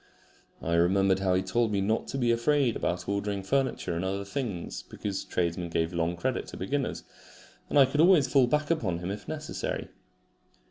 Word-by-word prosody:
I 85 - -1
remembered 95 +3 +3
how 95 -1 +2
he 95 - +2
had 95 - -10
told 120 -1 +2
me 100 - +1
not 105 +3 0
to 135 - -4
be 120 -3 +2
afraid 120 +1 +2
about 90 - -2
ordering 100 0 -2
furniture 130 -6 0
and 85 - -2
other 100 +1 -2
things, 100 -5 -4
because 100 -2 -5
tradesmen 85 0 -2
gave 80 +1 -1
long 85 0 0
credit 85 - -2
to - - -8
beginners, 135 +8 -2 0.7
and - - +1
I 140 - +8
could 145 +3 +1
always 170 -5 +6
fall 135 -3 +4
back 150 +4 +1
upon 105 - 0
him 90 +2 -4
if 100 -1 -7
necessary. 155 -1 -4
100 Hz, 190 wpm, -28 LUFS, 90-135 Hz, 0.7 s, I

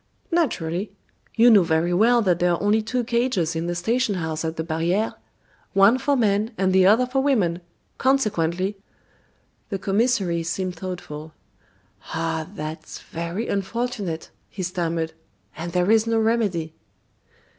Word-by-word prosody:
"Naturally. 195 - 0 0.4
You 235 +1 +6
know 210 -3 +7
very 165 +1 +1
well 230 +5 +4
that 180 -3 +2
there 175 0 +3
are - - -1
only 210 +2 +3
two 245 +3 -2
cages 235 -8 0
in 165 +1 -2
the 175 - -2
station 225 +5 0
house 160 -2 -3
at 160 0 -3
the 160 - -3
barriere 170 +6 0 0.6
one 200 +6 +5
for 285 0 +1
men 210 -1 +2
and 190 -1 +1
the 190 0 +5
other 225 +5 +5
for 265 +2 0
women; 200 -12 +1 0.4
consequently 195 -7 +1 0.5
" - - -41
The 195 - -2
commissary 195 -3 +1
seemed 180 +2 -3
thoughtful. 165 -4 -7 0.8
"Ah! 160 -1 -2
that's 155 -5 -7
very 170 +7 -5
unfortunate," 200 -4 -3 0.2
he 190 - -6
stammered; 170 -2 -2 0.4
"and 170 +2 -5
there 180 +3 +2
is 225 0 +4
no 230 0 +2
remedy." 210 -8 0
190 Hz, 145 wpm, -23 LUFS, 170-225 Hz, 0.8 s, know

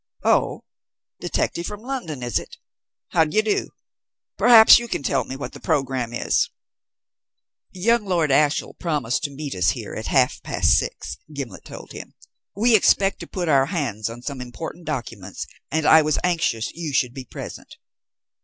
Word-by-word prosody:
Oh, - - +1 0.6
detective 170 0 -2
from 210 0 -7
London, 205 - -5
is 120 -3 0
it? - - -12 0.5
How 165 - +4
d'ye 160 +7 +1
do? 215 -1 -1 0.7
Perhaps 230 -2 +8
you 235 - -6
can 175 - -3
tell 135 -1 0
me 130 - -6
what 140 - -7
the - - -10
programme 135 -7 -1
is?" 120 - 0 1.2
"Young 220 +4 +1
Lord 170 -6 +1
Ashiel 145 +2 +2
promised 145 -8 -1
to - - -2
meet 145 0 -6
us 90 -2 +2
here - - -4
at - - -5
half - - +2
past - - +1
six," 70 - -3
Gimblet 140 -5 -7
told - - -10
him. - - -10 0.4
"We 225 +3 +4
expect 195 -1 +3
to - - -8
put 180 -2 -4
our 135 -3 +4
hands 120 - -2
on 120 +1 -9
some 140 -2 -5
important 160 +7 -8
documents, 115 - -5 0.2
and 160 +1 -1
I 160 +1 +7
was 155 -1 +1
anxious 165 -11 0
you 160 -3 -5
should 125 -3 +1
be 130 -1 -8
present." - - -9
150 Hz, 165 wpm, -23 LUFS, 130-180 Hz, 1.2 s, Perhaps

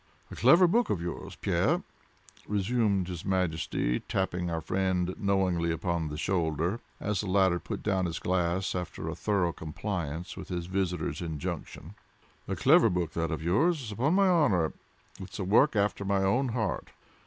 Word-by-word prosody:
"A - - -6
clever 150 - +6
book 235 +7 +2
that - - +1
of 90 - -4
yours, 85 - -6
Pierre," - - +1 0.6
resumed 100 -2 +1
his 90 -3 -6
Majesty, 80 -9 0
tapping 90 -2 -2
our 85 -1 -1
friend 90 +1 0
knowingly 95 -4 +1
upon 85 0 -1
the 75 0 -5
shoulder, 85 +3 0 0.2
as 105 -3 -1
the 105 - -5
latter 95 -2 +3
put 80 - -6
down 95 -3 +1
his 80 -1 -3
glass 90 +1 0
after 90 -3 -4
a 80 - -2
thorough 90 -1 0
compliance 85 0 -4
with - - -9
his 90 -2 -3
visitor's 90 -5 -2
injunction. 80 -4 -5 0.5
"A - - -2
clever - - +5
book 90 -2 -1
that 85 0 -2
of 80 -1 -3
yours, 125 - +1
upon 135 - +1
my 195 0 +5
honor. 125 - +3 0.5
It's 95 -1 -8
a 100 - -2
work 115 +8 +4
after 100 0 +1
my 100 0 +1
own 125 +8 +2
heart. 110 -4 -2
95 Hz, 165 wpm, -29 LUFS, 85-100 Hz, 0.6 s, clever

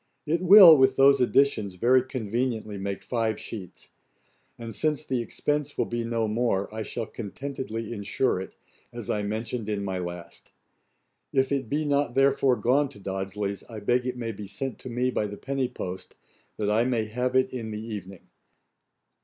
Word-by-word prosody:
It 165 +3 0
will, 185 -3 +10
with 130 -2 +4
those 140 0 +5
additions, 125 -7 +2
very 125 +7 +4
conveniently 120 -3 -3
make 100 0 -4
five 115 -3 -1
sheets. 95 -6 -8 0.7
And 115 -1 -7
since 155 +2 0
the 130 -2 -1
expense 145 +5 -2
will - - +1
be 120 0 -3
no 115 -1 -1
more, 105 -3 0
I 110 - -4
shall 115 +1 -4
contentedly 115 0 -6
insure 100 0 0
it, 95 - -9 0.4
as 120 -3 -4
I 105 - 0
mentioned 110 +2 -3
in 100 -1 -2
my 95 -1 -2
last. 85 -1 -8 0.8
If 135 0 +1
it 135 -5 -1
be 150 +3 0
not 140 -4 +1
therefore 135 -1 +3
gone 130 +6 +2
to 105 - -13
Dodsley's, 100 +1 -4
I 110 -2 -7
beg 125 +4 +1
it 125 0 -3
may 115 -2 -3
be 105 -1 -8
sent 120 +5 -5
me 125 +1 0
by 105 - -1
the 105 0 -8
penny 135 -1 -2
post, 90 -4 -7 0.4
that 105 -1 0
I 110 +2 +3
may 120 -3 0
have 125 +4 -2
it 130 0 +2
in 115 -3 -4
the 105 -1 -5
evening. 100 -4 -8
115 Hz, 175 wpm, -26 LUFS, 105-130 Hz, 0.8 s, will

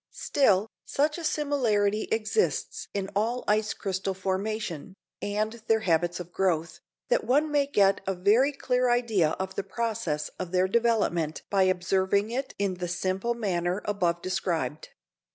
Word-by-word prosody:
Still, 210 -7 +2 0.2
such 300 +4 0
a - - -7
similarity 230 -10 +1
exists 220 - 0
in 195 -1 -3
all 230 +5 0
ice 215 +1 +2
crystal 190 0 -2
formation, 190 -2 -3 0.3
and 215 +3 -2
their 220 -1 +3
habits 175 -2 +1
of 175 0 -8
growth, 170 -3 0 0.3
that - - +2
one 295 +4 +2
may 285 -1 +2
get 200 -7 +3
a 195 - 0
very 215 +10 +4
clear 250 -2 0
idea 225 -10 +2
of 190 0 -4
the - - -2
process 195 -8 -2
of 185 - -4
their 185 0 +3
development 195 -8 +1
by 195 -2 +4
observing 190 +3 +1
it 265 +2 -3
in 200 -2 0
the 180 - -2
simple 185 +6 -1
manner 180 -4 -1
above 175 -4 0
described. 170 -6 -2
200 Hz, 150 wpm, -27 LUFS, 185-235 Hz, 0.3 s, very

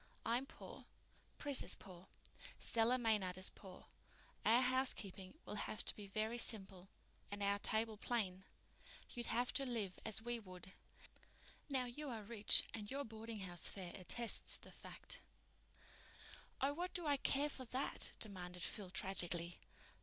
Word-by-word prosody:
I'm 245 +4 +1
poor—Pris 290 -2 -1
is - - +3
poor—Stella 225 +5 -1
Maynard 210 -6 +2
is 185 - +1
poor—our 215 +4 -1
housekeeping 250 -5 +1
will - - -5 0.2
have 215 - -1
to - - +4
be 205 -1 -7
very 220 +4 -1
simple 195 -5 +2 0.4
and 205 0 -2
our 200 0 +3
table 220 +1 +1
plain. 195 -5 -1 0.7
You'd 240 -1 -3
have 245 +2 +1
to 275 - +2
live 225 -8 -2
as 220 -1 +5
we 240 +1 -2
would. 185 -3 -11 1.0
Now, 260 -3 +2
you 280 +4 -4
are 225 -4 -4
rich 210 -1 +3
and 210 -2 -4
your 280 +2 -1
boardinghouse 220 - 0
fare 185 -3 -3
attests 225 +5 0
the - - -13
fact." - - -6 1.4
"Oh, 275 +2 +3
what 355 +4 -3
do 350 -3 0
I 290 -2 +3
care 280 +2 +2
for 260 -2 -5
that?" 255 +3 +1
demanded 180 -4 -3
Phil 200 -3 -3
tragically. 175 -2 0
220 Hz, 140 wpm, -41 LUFS, 190-245 Hz, 1.4 s, as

